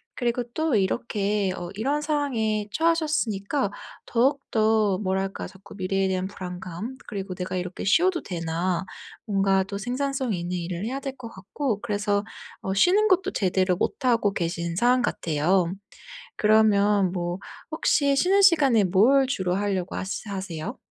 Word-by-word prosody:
그리고 240 0 -1
또 315 -5 +1
이렇게 200 -1 0
어 175 -1 -6
이런 275 +8 0
상황에 240 -9 -1
처하셨으니까 295 -9 0 0.3
더욱더 225 -6 +2
뭐랄까 190 0 -2
자꾸 195 +1 -14
미래에 190 0 0
대한 185 0 -1
불안감 185 +5 -7
그리고 195 -2 -5
'내가 185 0 -4
이렇게 180 0 -4
쉬어도 340 - +3
되나.' 170 +1 -2 0.4
뭔가 195 -2 +2
또 200 +1 -6
생산성 260 +2 -2
있는 175 0 -3
일을 175 +2 -4
해야 265 +4 -3
될 270 -1 -5
것 240 -3 -8
같고 215 +4 -3
그래서 205 -2 -1 0.4
어 190 - -2
쉬는 375 - +4
것도 380 -1 +2
제대로 185 -1 +1
못하고 230 -6 +1
계신 170 -1 -2
상황 245 +6 +3
같아요. 170 -2 +1 0.7
그러면 210 -3 +4
뭐 175 -1 -3 0.3
혹시 285 -3 +2
쉬는 380 +7 +4
시간에 280 - +5
뭘 230 +10 +4
주로 190 -9 -1
하려고 190 -2 -2
하시 195 +3 -4
하세요? 185 -5 -5
205 Hz, 305 characters per minute, -25 LUFS, 185-255 Hz, 0.7 s, 시간에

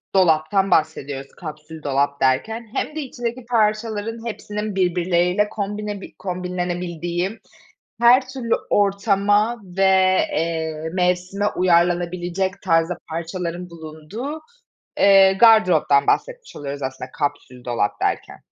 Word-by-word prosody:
dolaptan 185 +2 +3
bahsediyoruz 145 -3 0
kapsül 155 -1 -9
dolap 140 0 0
derken 220 - 0
hem 305 - -2
de 310 - -2
içindeki 245 -2 -5
parçaların 225 0 -1
hepsinin 210 -2 -5
birbirleriyle 180 +2 +1
kombine 205 0 -4
bi - - -11
kombinlenebildiği 180 +1 -3 0.6
her 250 +2 +5
türlü 255 -3 -1 0.2
ortama 205 +3 +2
ve, 190 +1 -3 0.5
eee, 160 -1 -2
mevsime 180 +2 0
uyarlanabilecek 175 +2 0
tarzda 165 -1 +1
parçaların 170 +1 -4
bulunduğu, 170 - -7 0.6
eee, 195 -1 +6
gardıroptan 190 -9 +5
bahsetmiş - - -1
oluyoruz 140 -1 -6
aslında 130 -1 -5
kapsül 130 -4 -4
dolap 120 -4 -1
derken. - - -2
180 Hz, 105 wpm, -21 LUFS, 160-210 Hz, 0.6 s, eee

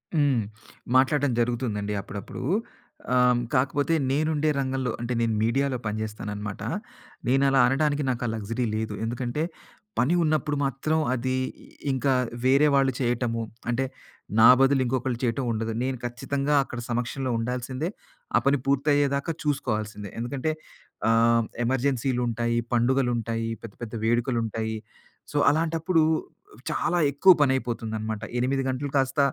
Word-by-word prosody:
హ్మ్. 140 -6 +3 0.5
మాట్లాడటం 135 +1 +4
జరుగుతుందండి 115 -4 -1
అప్పుడప్పుడు. 100 +4 -7 0.7
ఆ! - - +4 0.4
కాకపోతే 140 +4 +1 0.2
నేనుండే 155 +1 +1
రంగంలో 130 -2 -1
అంటే 120 +1 -2
నేను 115 -1 +1
మీడియాలో 130 +4 +1
పనిచేస్తాననమాట. 105 -1 -4 0.7
నేను 135 +2 +3
అలా 135 0 +3
అనడానికి 145 +2 +1
నాకు 125 -1 -1
ఆ - - -1
లక్సరీ 115 +4 -2
లేదు. 110 -1 -2
ఎందుకంటే 120 +5 -2 0.6
పని 135 +9 +3
ఉన్నప్పుడు 150 -2 +1
మాత్రం 140 +4 0 0.2
అది, 130 +1 -1 0.6
ఇంకా 135 +1 +1 0.3
వేరే 140 +3 +5
వాళ్ళు 135 -1 +4
చేయటము 120 -2 0 0.3
అంటే, 130 +3 +1 0.5
నా 115 - +9
బదులు 135 0 +4
ఇంకొకళ్ళు 125 -1 -1
చేయటం 120 +2 0
ఉండదు. 115 0 -2
నేను 130 0 -1
ఖచ్చితంగా 140 +4 -1
అక్కడ 120 -3 -7
సమక్షంలో 125 +2 -2
ఉండాల్సిందే, 125 +6 -2 0.5
ఆ - - +6
పని 140 +1 +4
పూర్తయ్యేదాకా 140 +2 +2
చూసుకోవాల్సిందే 110 - -2
ఎందుకంటే 135 +6 -2 0.6
ఆహ్, 115 +1 +4 0.2
ఎమర్జెన్సీలుంటాయి, 120 -2 0 0.2
పండుగలుంటాయి, 120 -2 +1
పెద్ద 115 -3 -8
పెద్ద 115 0 -7
వేడుకలుంటాయి. 115 -2 0 0.6
సో, - - 0
అలాంటప్పుడు 165 +2 +1 0.7
చాలా 175 +1 0
ఎక్కువ 185 +7 +6
పనైపోతుందన్నమాట. 110 -5 -1 0.2
8 135 +2 +1
గంటలు 130 +2 -3
కాస్త 135 +2 +1
130 Hz, 120 wpm, -26 LUFS, 115-140 Hz, 0.7 s, నా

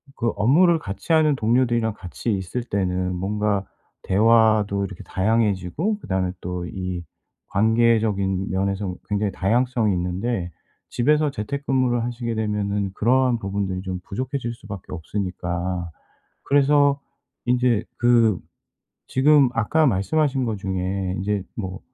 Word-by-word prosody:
그 115 - -1
업무를 165 - +4
같이하는 155 - +1
동료들이랑 115 -1 +1
같이 100 +5 -4
있을 95 +5 -3
때는 90 -4 -1
뭔가 100 +1 -1 1.0
대화도 100 -1 -2
이렇게 95 -3 -8
다양해지고 110 - 0
그다음에 95 - -1
또 90 0 -4
이 90 -1 -4 0.5
관계적인 110 -3 +2
면에서 95 0 -1
굉장히 105 -1 0
다양성이 115 +2 +1
있는데 90 +2 -2 0.4
집에서 150 +4 +2
재택근무를 130 +1 -1
하시게 120 -1 -3
되면은 105 -2 -1
그러한 125 +3 +2
부분들이 95 -2 -2
좀 95 -1 -4
부족해질 130 +2 -3
수밖에 100 -6 -9
없으니까. 90 0 -3 0.5
그래서 145 0 +3 0.5
인제 125 -3 +2
그 115 -4 +4 0.7
지금 140 +1 +5
아까 130 +8 +2
말씀하신 135 +6 +1
것 110 -3 -2
중에 95 0 -2
인제 100 +1 -1
뭐 95 -3 -5
105 Hz, 295 characters per minute, -23 LUFS, 95-125 Hz, 1.0 s, 지금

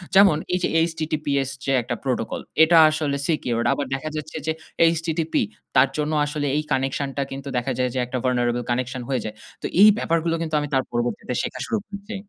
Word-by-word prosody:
যেমন 195 -6 +7 0.2
এই 180 - +2
যে - - +3 0.2
HTTPS 155 -4 -1 0.2
যে 135 - +1
একটা 120 +1 -3
প্রোটোকল। 125 -4 -2 0.2
এটা 165 +1 +5
আসলে 155 -2 -1
secured 120 -7 0
আবার 145 - -2
দেখা 135 +4 -3
যাচ্ছে 155 +1 -5
যে - - +3 0.4
HTTP 165 0 -2 0.4
তার 135 - +6
জন্য 150 +1 -1
আসলে 145 0 -3
এই 150 - 0
কানেকশন 135 +1 0
টা 140 - +1
কিন্তু 135 +1 -6
দেখা 125 +2 -1
যায় 125 0 +1
যে 130 - -1
একটা 125 +1 -4
vulnerable 120 -1 +1
connection 125 +1 -1
হয়ে 130 -3 0
যায়। 110 0 -5 0.3
তো - - -5 0.2
এই 210 - +10
ব্যাপারগুলো 165 -4 0
কিন্তু 160 -2 -2
আমি 145 - -2
তার 130 -1 +3
পরবর্তীতে 120 +1 -2
শেখা - - -5
শুরু 220 - 0
করছি 205 +2 -8
140 Hz, 195 wpm, -23 LUFS, 130-160 Hz, 0.4 s, এই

